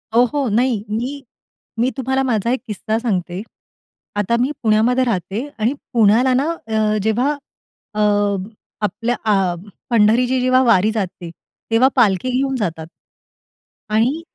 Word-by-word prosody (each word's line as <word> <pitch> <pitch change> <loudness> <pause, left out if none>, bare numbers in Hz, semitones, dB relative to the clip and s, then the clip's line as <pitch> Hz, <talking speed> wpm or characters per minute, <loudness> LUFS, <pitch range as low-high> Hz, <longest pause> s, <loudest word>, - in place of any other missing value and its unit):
ओ, 245 - +6
हो. 280 +2 -1
नाही. 230 0 +1
मी 255 +6 -3 0.6
मी 250 +2 +3
तुम्हाला 265 +1 0
माझा 235 -2 0
एक 260 - -1
किस्सा 215 +1 -2
सांगते. 185 -6 -2 0.7
आता 205 +3 +1
मी 265 +4 +1
पुण्यामध्ये 230 +4 +3
राहते 215 +3 -2
आणि 230 +6 +1 0.2
पुण्याला 235 +3 +4
ना 275 +5 +1 0.2
अ, 215 -1 +1
जेव्हा 240 +6 +1 0.6
अ, 210 - -4 0.8
आपलं 230 +4 -1
आ 195 -4 +2 0.4
पंढरीची 240 +3 +3
जेव्हा 255 +1 +4
वारी 220 -3 +4
जाते, 185 -5 -4 0.4
तेव्हा 230 +4 +5
पालखी 225 0 +3
घेऊन 270 0 0
जातात. 165 -9 -3 1.0
आणि 235 +9 +1
230 Hz, 130 wpm, -19 LUFS, 210-255 Hz, 1.0 s, ओ